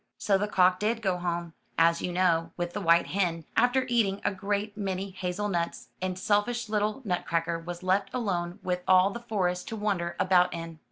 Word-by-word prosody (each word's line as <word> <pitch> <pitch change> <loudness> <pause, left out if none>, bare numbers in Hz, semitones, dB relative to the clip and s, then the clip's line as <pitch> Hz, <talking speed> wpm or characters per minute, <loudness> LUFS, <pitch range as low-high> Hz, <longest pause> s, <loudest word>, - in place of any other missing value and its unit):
So 200 - +2
the 205 +2 +1
cock 185 -2 +3
did 225 +2 -1
go 190 -3 +1
home, 170 -1 -3 0.2
as 165 0 +4
you 180 - -2
know, 170 -2 +1
with 175 0 -3
the 205 - -3
white 170 -1 +4
hen, 175 -4 -1
after 255 +1 +3
eating 215 -5 +1
a - - +2
great 205 +2 -2
many 195 -1 -3
hazel 185 +2 -3
nuts, 170 -4 -3
and 185 -1 -2
selfish 210 +4 0
little 215 +4 -1
Nutcracker 170 -3 -1
was 175 +1 -7
left 195 +1 +1
alone 180 -7 -2
with 180 -1 -1
all 185 +1 +5
the 235 - -6
forest 190 -6 -1
to 225 - -4
wander 195 -5 -1
about 180 -1 +4
in. 165 -1 -7
185 Hz, 190 wpm, -28 LUFS, 175-205 Hz, 0.2 s, all